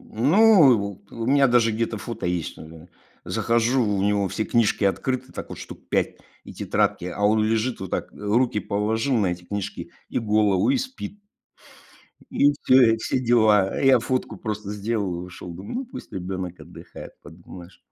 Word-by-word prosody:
Ну, 155 - +5
вот, 100 0 -7
у 115 -1 -5
меня 140 +1 +4
вот 120 - -1
даже 115 -2 +4
где-то 115 +1 -2
фото 115 -2 -5
есть: 90 -3 -3 0.7
захожу, 120 +3 +1
у 100 -2 0
него 100 -1 +1
все 110 - -2
книжки 115 -2 +1
открыты, 125 +6 -1
так - - -7
вот, - - -7 0.3
5 - - +2
штук, - - -28 0.3
и - - -11
тетрадки, 90 - -1
а 90 +3 -5
он 110 +1 +3
лежит 115 +3 -1
вот 95 - -6
так, - - -3
руки 105 +2 0
положил 110 +6 -1
на 100 -5 +2
эти 90 0 -9
книжки, 100 +1 -5 0.2
и - - -2
голову, 105 -1 +2
и - - +3
спит. 260 -5 -7 1.1
И 145 - +4
всё, 130 -3 +6
и - - -1
все 110 - -1
дела. 110 -5 +3
Я 135 -2 +5
фотку 130 +2 -3
просто 105 -2 -5
сделал 105 -2 -2
и - - -7
ушел, 90 -1 -9
думаю: 95 - -8
"Ну, 270 - -6
пусть 250 - -10
ребенок 95 -1 -5
отдыхает. - - -11
Подумаешь". 85 +1 -13
110 Hz, 175 wpm, -23 LUFS, 100-120 Hz, 1.1 s, всё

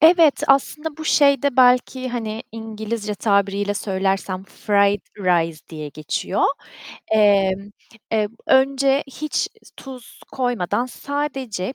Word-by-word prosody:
Evet, 325 -2 +5
aslında 295 +3 +1
bu 315 - -7
şeyde 280 -3 +3
belki, 255 0 +3
hani, 225 -2 -4
İngilizce 220 -1 -5
tabiriyle 200 0 +1
söylersem 190 -1 -2
fried 200 0 +1 0.2
rice 170 -4 +1
diye 155 -2 -7
geçiyor. 155 +6 -3 0.7
Emm, 200 -2 +3 0.4
eee, 215 -2 +1 0.2
önce 270 +1 +3
hiç 300 +3 -3 0.3
tuz 255 -3 -11
koymadan 245 -3 -1
sadece 270 -6 -4
220 Hz, 100 wpm, -21 LUFS, 200-270 Hz, 0.7 s, Evet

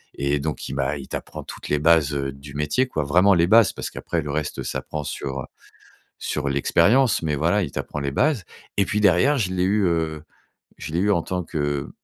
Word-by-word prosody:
et 70 +1 0
donc 75 -1 -4
il - - -5
m'a 70 +2 -1
il 70 - -9
t'apprend - - -6
toutes - - -9
les 75 - +2
bases, 80 -1 +4
heu, 70 -1 -2
du 70 +1 -12
métier, 75 - +1
quoi, 80 -11 -2
vraiment 90 +8 +5
les 85 -1 +3
bases 115 +2 +6
parce - - -5
qu'après 85 - -3
le 75 -1 -5
reste 75 0 -3
s'apprend 75 -1 -4
sur, 70 -2 -4
heu, - - -8 0.7
sur 75 -2 -2
l'expérience 100 - +3
mais, 75 -2 0
voilà, 85 +8 +2
il 75 - -5
t'apprend 75 - -4
les 70 -1 -2
bases 135 - +1 0.3
et 100 - +3
puis 105 +2 -1
derrière, 105 +9 +4
je 95 -7 -1
l'ai 90 -1 0
eu, 100 +2 +2
heu, 80 -3 -1 0.6
je 75 - -7
l'ai 85 - +1
eu 105 +2 +2
en 85 -5 +2
tant 90 +1 -3
que 75 -4 -2
80 Hz, 220 wpm, -23 LUFS, 70-95 Hz, 0.7 s, bases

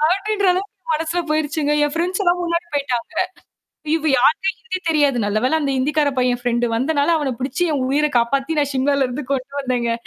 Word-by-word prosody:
அப்டின்ற 405 0 -1
அளவுக்கு 390 +3 -2 0.2
மனசுல 325 +3 -1
போயிருச்சுங்க. 305 -1 0
என் 295 0 0
ஃப்ரண்ட்ஸ்லாம் 355 +1 +1
முன்னாடி 340 0 -1
போய்ட்டாங்க. 255 -5 -2 0.8
இவ 320 -1 -1
யாருக்க 320 +9 +3
ஹிந்தி 425 -6 -5
தெரியாது. 290 -5 +2
நல்ல 210 +1 0
வேள 315 +5 +2
அந்த 280 -2 0
ஹிந்திக்கார 290 +2 +1
பையன் 250 -1 +1
ஃப்ரண்டு 240 -1 +1
வந்தனால, 285 +4 +1
அவன 285 -4 -1
பிடிச்சு 275 +6 -2
என் 275 -3 0
உயிர 300 +2 +2
காப்பாத்தி 275 +6 0
நான் 285 -1 0
ஷிம்லால 275 0 +2
இருந்து 260 +3 -5
கொண்டு 265 +1 -3
வந்தேங்க. 245 -3 -1
290 Hz, 175 wpm, -20 LUFS, 260-325 Hz, 0.8 s, யாருக்க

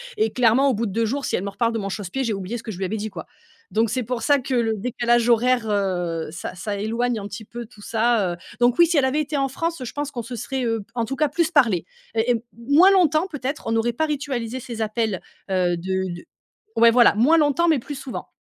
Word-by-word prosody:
Et 435 +1 +1
clairement 250 +3 +4
au 260 - +2
bout 225 +2 -1
de 200 - -4
2 230 +2 +1
jours 275 +5 -2
si - - 0
elle - - -2
me 200 - -3
reparle 230 +4 0
de 225 - -1
mon 195 -1 -3
chausse-pied, 205 +6 -3
j'ai 230 - -1
oublié 195 +4 -4
ce 225 - -10
que 220 - -5
je 180 - -8
lui 190 - -2
avais 210 - -2
dit, 220 0 -3
quoi. 175 -6 -8 0.5
Donc 225 0 +2
c'est 250 +2 -1
pour 235 0 -3
ça 285 +2 +4
que 260 +1 -4
le 230 -2 +2
décalage 240 +1 +1
horaire, 240 -1 +3
heu, 180 -5 -1
ça 175 +2 -6
ça 205 +3 -4
éloigne 230 +3 -1
un 200 - -6
petit 210 +2 -8
peu, 235 +2 -7
tout 215 -2 -17
ça, 225 -4 +1
heu - - -8 0.2
donc 245 0 +3
oui, 345 - +7
si 335 -1 0
elle 275 - +4
avait 275 +4 +1
été 295 0 -3
en 275 -1 +1
France, 330 +3 -3
je - - -6
pense 290 0 -3
qu'on 240 -4 -5
se 245 +2 -7
serait, 250 +3 -3
heu, 225 -2 -1
en 235 -2 -1
tout 270 - -4
cas, 295 +2 +1
plus 335 +1 0
parlé 225 - +3 0.3
et 230 +2 +2
heu, 225 - -4 0.3
moins 330 +8 +7
longtemps 350 -3 +3
peut-être, 290 -3 -5
on - - 0
n'aurait 225 +1 +1
pas 315 +7 0
ritualisé 260 -5 -3
ces 235 -2 -6
appels, 215 -3 -1 0.3
heu, 180 -2 +1
de 190 +1 -2
de 175 - -10 0.5
ouais 230 0 +6
voilà, 240 -2 +5
moins 270 +10 +5
longtemps 310 +3 +3
mais 310 -4 +3
plus 285 +4 -7
souvent. 265 -1 -7
235 Hz, 265 wpm, -23 LUFS, 210-270 Hz, 0.5 s, oui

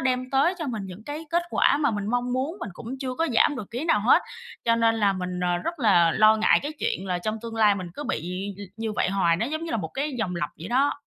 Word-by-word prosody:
đem 255 -1 -1
tới 280 +7 +3
cho 320 - -3
mình 225 -6 -3
những 190 +3 -10
cái 300 +4 -6
kết 345 +1 +2
quả - - +3
mà 285 -2 +2
mình 205 -2 -3
mong 245 +2 -1
muốn, 270 +8 -2
mình 205 - -5
cũng 240 +8 -7
chưa 255 -2 -3
có 325 +5 0
giảm 275 +5 +4
được 215 -3 -7
ký 245 +6 -4
nào 265 -11 +3
hết, 225 +5 +5 0.4
cho 230 0 +4
nên 230 0 +3
là 205 -3 +2
mình, 180 -1 -4
ờ, 175 -1 +1
rất 335 - -4
là 175 -7 +5
lo 215 0 +5
ngại 220 - +4
cái 295 - -4
chuyện 190 -8 -2
là 180 -1 -1
trong 215 +4 -3
tương 230 -1 -6
lai 210 -2 +5
mình 185 -2 -5
cứ 295 - -6
bị 180 - -3
l - - -11 0.2
như 225 -1 -3
vậy 205 - 0
hoài, 180 -4 +2
nó 220 +7 -1
giống 315 +4 -3
như 330 - -5
là - - 0
một 175 -7 -4
cái 275 - -3
vòng 180 -5 -2
lặp 150 -3 -2
vậy 165 +5 -7
đó. 270 +4 +2
225 Hz, 285 wpm, -25 LUFS, 195-270 Hz, 0.4 s, hết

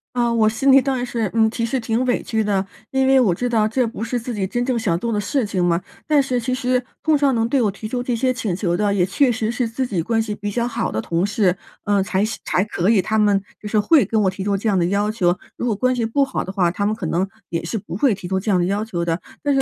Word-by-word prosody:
啊， 240 -1 +1
我 220 -2 +4
心 265 +5 +2
里 270 0 +7
当 270 0 -1
然 245 - -2
是， 230 -4 -2
嗯 220 -1 +4
其 230 0 -2
实 255 +3 -1
挺 230 +1 0
委 245 - 0
屈 220 -1 -1
的， 200 -2 0 0.3
因 265 0 +2
为 265 0 +5
我 205 -9 +3
知 245 - -2
道 225 -3 +2
这 245 +3 +1
不 225 -1 -5
是 240 +2 -2
自 240 +1 -5
己 200 -3 -2
真 240 +5 -1
正 255 -2 0
想 195 -7 0
做 235 +4 -2
的 210 - 0
事 245 +5 0
情 190 -3 -1
嘛， 175 0 +2 0.3
但 300 -2 +4
是 255 -2 -1
其 255 +2 -1
实 255 -1 0 0.2
碰 315 -1 +3
上 280 -2 +2
能 225 0 +1
对 265 +2 +2
我 215 - +2
提 205 +2 -7
出 245 +3 -2
这 245 -1 -1
些 255 +2 +1
请 215 -7 -2
求 175 -2 0
的， 205 +2 +1
也 185 -3 +2
确 250 +8 +2
实 220 -1 -1
是 245 0 -1
自 230 +4 -2
己 195 -8 -1
关 225 +7 0
系 220 -1 -3
比 205 0 -4
较 235 +3 -1
好 235 -1 -2
的 110 - -2
同 170 +7 0
事， 200 -3 +1 0.3
呃， 205 -1 +2
才 195 +1 0
行 220 - -5
才 180 - +1
可 195 -3 -1
以， 225 -3 +4
他 220 +3 0
们 205 -2 +3 0.2
就 210 - -6
是 215 - +2
会 280 +8 +5
跟 220 - 0
我 190 - +3
提 190 +1 -5
出 200 0 0
这 210 - -3
样 195 - +2
的 170 - +2
要 200 +3 +1
求， 180 -5 +1 0.2
如 - - -4
果 225 - +1
关 255 +4 +1
系 240 - -1
不 275 +5 +2
好 - - -3
的 190 - -6
话， 185 -3 +1
他 200 +3 -2
们 215 +1 +1
可 215 - -6
能 180 +4 0 0.2
也 165 -1 -2
是 170 +7 -3
不 175 -4 -7
会 225 +2 +2
提 185 -1 -8
出 190 +1 0
这 210 - -4
样 185 -3 +3
的 175 - +1
要 200 +3 0
求 175 -6 -3
的。 165 +1 -1 0.2
但 290 -1 +2
是 270 - +3
220 Hz, 330 characters per minute, -21 LUFS, 195-245 Hz, 0.3 s, 里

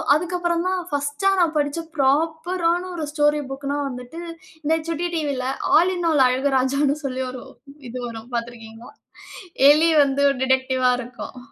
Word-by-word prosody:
அதுக்கப்புறம் 345 +1 -1
தான் 370 -1 0
1டா 290 +6 0
நான் 330 -2 +1
படிச்ச 290 +2 0
ஃப்ராப்பரான 330 +5 +1
ஒரு 320 -3 -3
ஸ்டோரி 295 -1 +2
புக்னா 280 +1 -3
வந்துட்டு 250 +6 -8 0.4
இந்த 315 +2 +2
சுட்டி 335 +1 -2
டிவில 285 -5 -2 0.3
ஆல் 350 +3 +4
இன் 350 -1 -1
ஆல் 290 -4 +4
அழகு 260 +3 +1
ராஜான்னு 275 +2 +1
சொல்லி 260 -1 -3
ஒரு 255 0 -8 0.5
இது 245 - -7
வரும் 230 +1 -9
பார்த்திருக்கீங்களா? 235 -1 -7 0.8
எலி 315 +3 +4
வந்து 280 0 0 0.2
டிடெக்டிவா 260 -1 +2
இருக்கும். 245 +1 -8
285 Hz, 140 wpm, -22 LUFS, 260-330 Hz, 0.8 s, ஆல்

